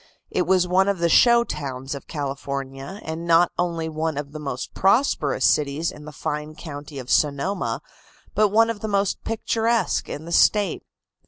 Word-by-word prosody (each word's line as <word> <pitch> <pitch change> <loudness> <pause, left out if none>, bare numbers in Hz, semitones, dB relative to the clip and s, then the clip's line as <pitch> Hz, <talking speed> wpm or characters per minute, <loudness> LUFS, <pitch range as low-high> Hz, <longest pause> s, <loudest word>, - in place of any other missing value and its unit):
It 180 - 0
was 185 -1 +3
one 190 +2 +3
of 200 -1 +1
the 170 0 +1
show 235 +7 +6
towns 135 - -5
of 140 - -8
California, 140 +3 -5
and 160 +2 -5
not 170 +1 +5
only 170 -2 -1
one 160 -1 -2
of 145 -1 -4
the 155 - -7
most 135 -4 -5
prosperous 190 - +2
cities 150 +3 +2
in 150 0 -12
the 150 - -8
fine 150 +1 -4
county 145 -2 -8
of 130 -2 -7
Sonoma, 150 +7 0 0.5
but 215 - +4
one 225 +3 +3
of 220 - -7
the 220 - -4
most 200 -1 0
picturesque 225 -1 0
in 150 - -6
the 170 - -8
State. 205 +1 +3
160 Hz, 175 wpm, -23 LUFS, 145-195 Hz, 0.5 s, show